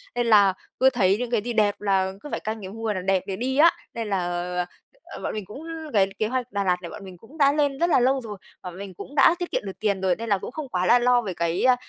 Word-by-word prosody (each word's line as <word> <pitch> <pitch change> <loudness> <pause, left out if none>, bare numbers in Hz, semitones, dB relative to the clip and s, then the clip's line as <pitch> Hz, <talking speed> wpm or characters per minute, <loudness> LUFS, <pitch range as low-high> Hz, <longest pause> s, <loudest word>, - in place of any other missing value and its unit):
nên 240 -1 0
là 205 -4 +6 0.3
cứ 265 - +6
thấy 200 -6 +2
những 245 -1 -3
cái 235 -3 +2
gì 240 +3 -4
đẹp 210 -2 +1
là 190 -2 +1
cứ 295 - -9
phải - - -2
canh 220 0 -5
cái 190 - -7
mùa 220 +1 -3
nào 185 - -3
đẹp 190 -1 +1
để 195 - -3
đi 260 +5 -2
á, 330 +3 +7 0.2
nên 230 -2 -4
là, 195 - +1 0.9
ờ, - - -10
bọn - - -2
mình 215 -2 -5
cũng 235 - -10 0.3
cái 195 -3 +4
kế 215 - +1
hoạch 250 +1 -3
Đà 200 -1 -1
Lạt 180 -2 +2
này 170 - -7
bọn 210 - -9
mình 185 -1 -11
cũng 225 - -16
đã 280 -2 +4
lên 285 -2 0
rất 340 - +3
là - - +5
lâu 260 +2 +2
rồi, 215 -4 -7 0.3
bọn 180 -1 -7
mình 195 -1 -8
cũng 275 +10 -10
đã 300 +4 +6
tiết 355 - -4
kiệm - - 0
được 195 - -7
tiền 200 -3 0
rồi 185 -2 +2
nên 230 0 -6
là 200 - +3
cũng 190 - -7
không 300 -1 -6
quá 180 -5 -1
là 240 +7 +6
lo 245 0 +4
về 200 -5 -4
cái, 170 0 -1
ơ, 255 -1 +6
215 Hz, 300 wpm, -24 LUFS, 190-250 Hz, 0.9 s, á